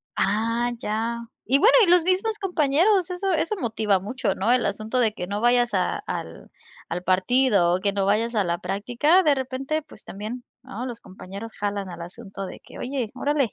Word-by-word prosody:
Ah, 230 +4 +1
ya, 225 +2 -2 0.3
y 270 +4 +3
bueno, 445 +9 +6
y - - -1
los 350 -1 +6
mismos 390 +5 0
compañeros, 360 +1 +2
eso 380 +2 -1
eso 330 +5 0
motiva 220 - +1
mucho, 205 +1 -2
¿no?, 210 +5 +1
el 250 0 +3
asunto 215 +5 -1
de 225 -3 +2
que 180 - -5
no 205 +2 -3
vayas 240 0 +3
a 185 -2 +1
al - - -6 0.4
al 180 - -3
partido, 190 0 +3
o - - -1
que 200 - +1
no 195 -1 0
vayas 220 +4 +1
a 210 - +3
la 170 -1 -1
práctica 240 - +2
de 295 -4 +4
repente, 270 +4 -2
pues, 300 - -16
también, 215 +5 -6 0.2
¿no?, 250 -2 -6
los 240 -3 -6
compañeros 195 +4 -9
jalan 200 -2 -3
al 175 - -8
asunto 195 +2 -8
de - - -9
que: - - -13
"Oye, 255 -4 -3
órale, 280 -2 0
235 Hz, 195 wpm, -24 LUFS, 200-275 Hz, 0.4 s, bueno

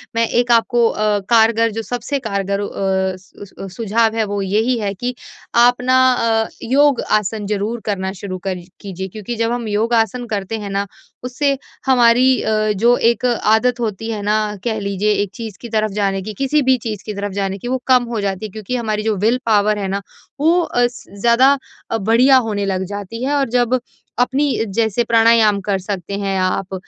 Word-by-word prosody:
मैं 230 0 +2
एक 240 +1 +1
आपको 235 0 +3
अ, 210 -1 0
कारगर 230 0 +4
जो 225 +2 -4
सबसे 245 +4 -3
कारगर 200 -4 -2
अ, 190 -2 -1
स 185 +1 -22
उस 200 -1 -10
अ, 195 - -5
सुझाव 225 +3 0
है 225 - +1
वो 205 -1 -3
यही 220 +6 +1
है 200 -2 -2
कि 245 +6 -4 0.4
आप 240 +1 +6
न 250 - -4
अ, 245 -4 +3 0.2
योग-आसन 230 -6 +1
ज़रूर 210 +3 -2
करना 190 -3 -2
शुरू 190 -1 -6
कर 190 - -1 0.3
कीजिए 190 -1 -6
क्योंकि 215 +4 -6
जब 230 0 0
हम 240 -2 -3
योगा-आसन 225 +2 0
करते 210 0 -3
हैं 205 -1 -6
न 200 +1 0 0.4
उससे 275 +3 0 0.3
हमारी 245 -1 +4 0.5
जो 235 +5 +4
अ, - - -4
एक 235 +2 +2
आदत 240 +1 +2
होती 225 -1 -3
है 215 -2 -4
न 210 0 0
कह 220 -2 -1
लीजिए 200 +1 -1
एक 200 - -7
चीज़ 225 -5 -7
की 235 - -8
तरफ़ 215 -1 0
जाने 195 -1 0
की 215 +3 -6
किसी 295 +3 +2
भी 260 -1 +3
चीज़ 210 -3 -5
की 215 - -4
तरफ़ 200 0 -4
जाने 195 -1 -2
की 220 - -8
वो 260 +1 0
कम 255 -2 +5
हो 220 - -1
जाती 195 +1 -3
है 210 - -7
क्योंकि 215 +4 -5
हमारी 215 -3 -2
जो 220 -1 0
विल 240 +3 +2
पावर 210 -1 +3
है 195 - -2
ना 195 +1 -2 0.4
वो 330 +4 +3
अ, 245 -7 +1
स 245 - -12 0.2
ज़्यादा 255 +5 +5 0.3
अ, 225 - +1
बढ़िया 230 +6 +4
होने 205 -1 -1
लग 190 -1 -1
जाती 205 +4 -6
है। 275 +2 0
और 275 -3 0
जब 245 +1 +1 0.4
अपनी 265 +4 +2 0.3
जैसे 225 0 +1
प्राणायाम 225 -2 +4
कर 195 0 -1
सकते 190 -1 -5
हैं 195 -1 -1
आप, 185 +1 -1
220 Hz, 200 wpm, -18 LUFS, 200-240 Hz, 0.5 s, आप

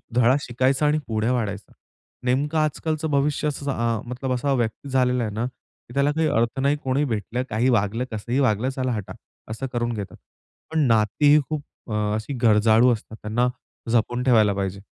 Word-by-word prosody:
धडा 125 +1 +5
शिकायचा 130 +3 +1
आणि 150 +1 +2
पुढे 110 0 0
वाढायचा. 105 -5 -2 0.5
नेमकं 145 +5 +1
आजकालचं 155 +1 -1
भविष्य 145 +1 +1
असंच 140 -1 -4
अ, 115 -4 0
मतलब 125 +1 -3
असा 130 +3 0
व्यक्ती 120 +2 -2
झालेला 125 -2 +2
आहे 105 - -3
ना, 115 +2 -1
की 125 0 -15
त्याला 140 +1 +3
काही 160 +1 +1
अर्थ 120 +3 0
नाही 140 +2 +2
कोणी 135 +3 +1
भेटलं, 115 0 -2
काही 115 +5 +1
वागलं 115 0 +1
कसंही 120 +4 -2
वागलं 125 -1 +2
चला 130 -1 -2
हटा, 105 -4 -4 0.4
असं 115 +5 -4
करून 120 0 -1
घेतात. 105 -4 -6 0.6
पण 160 - +1
नाती 115 +6 +3
ही 150 - +6
खूप 155 -2 -3 0.3
अ, 105 0 0
अशी 110 +6 -4
गरजाळू 110 +2 +5
असतात 110 -1 -6
त्यांना 115 +4 +1 0.4
जपून 120 +2 +1
ठेवायला 110 -5 +4
पाहिजे. 100 0 -3
125 Hz, 175 wpm, -23 LUFS, 110-140 Hz, 0.6 s, ही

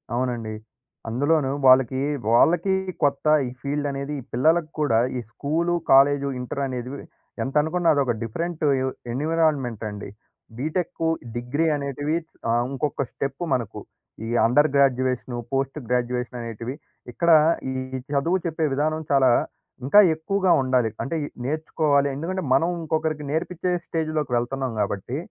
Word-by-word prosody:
అవునండి. 120 -3 -2 0.5
అందులోను 140 +3 +1
వాళ్ళకి 130 0 +5 0.3
వాళ్ళకి 175 +10 +4 0.3
కొత్త 140 0 +1 0.2
ఈ - - -4
ఫీల్డనేది 140 0 -3
ఈ - - -14
పిల్లలకి 155 +5 +2
కూడా 130 -7 +3 0.2
ఈ - - -1
స్కూలు, 165 +7 -1 0.2
కాలేజు 140 +1 +5
ఇంటరనేదివి 130 0 -4 0.5
ఎంతనుకున్నా 160 +5 +1
అదొక 135 -4 +1
డిఫరెంటు 165 +8 -3 0.2
ఎ - - 0 0.3
ఎన్విరాన్మెంటండి. 130 -8 -1 0.5
బీటెక్కు, 165 +4 -2 0.3
డిగ్రీ 125 +7 -1
అనేటివి 145 +2 -2 0.4
ఆహ్, 120 +1 +2
ఇంకొక్క 140 +1 -2
స్టెప్పు 140 +4 -4
మనకు. 120 -6 -3 0.5
ఈ - - -5 0.2
అండర్ 145 +7 +4
గ్రాడ్యుయేషను, 130 -2 +1 0.2
పోస్ట్ 135 +1 -1
గ్రాడ్యుయేషననేటివి. 125 -1 -3 0.4
ఇక్కడ 170 +8 0 0.4
ఈ - - -3 0.4
చదువు 165 +6 +2
చెప్పే 160 -1 -1
విధానం 155 +3 0
చాలా 135 -2 +5 0.6
ఇంకా 145 +10 +6 0.2
ఎక్కువగా 190 +3 0
ఉండాలి. 130 -3 +2
అంటే 165 - -3
ఇయి 145 - -5 0.2
నేర్చుకోవాలి. 150 -1 +1
ఎందుకంటే, 180 +6 -3
మనం 165 +6 +3
ఇంకొకరికి 155 -1 -2
నేర్పించే 180 +3 -2
స్టేజ్‌లోకి 155 -4 -2
వెళ్తున్నాం 130 +2 -2
కాబట్టి, 105 +5 -3
140 Hz, 120 wpm, -24 LUFS, 125-160 Hz, 0.6 s, ఇంకా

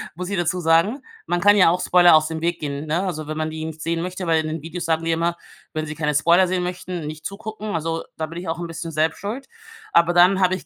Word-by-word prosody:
muss 180 +2 -5
ich 200 - -2
dazu 175 +1 0
sagen. 170 - +2 0.2
Man 175 - 0
kann 205 +3 +6
ja 185 -5 +6
auch 180 +2 0
Spoiler 175 -2 +6
aus 155 0 +4
dem 160 0 -5
Weg 170 0 -1
gehen, 145 0 -4
ne? 165 +5 0
Also 155 -5 -4
wenn 155 0 -4
man 155 0 -2
die 155 0 -5
nicht 160 -1 -7
sehen 165 0 -1
möchte, 185 +1 -4
weil 165 -1 +3
in 155 - -4
den 155 0 -4
Videos 170 +2 -5
sagen 165 0 0
die 165 - +1
immer: 170 +1 0 0.4
„Wenn 155 0 -2
Sie 150 - -5
keine 150 -1 -1
Spoiler 170 +5 +4
sehen 180 0 -1
möchten, 180 -2 -5
nicht 155 0 -8
zugucken.“ 215 0 -5
Also 165 0 -2
da 160 - -2
bin 165 +2 -7
ich 180 - -8
auch 165 - -3
'n 170 - -4
bisschen 165 0 -6
selbst 155 0 0
schuld. 225 +7 -5 0.5
Aber 170 +1 +4
dann 180 +2 +5
habe 185 0 +3
ich 185 - -9
170 Hz, 275 wpm, -22 LUFS, 160-180 Hz, 0.5 s, kann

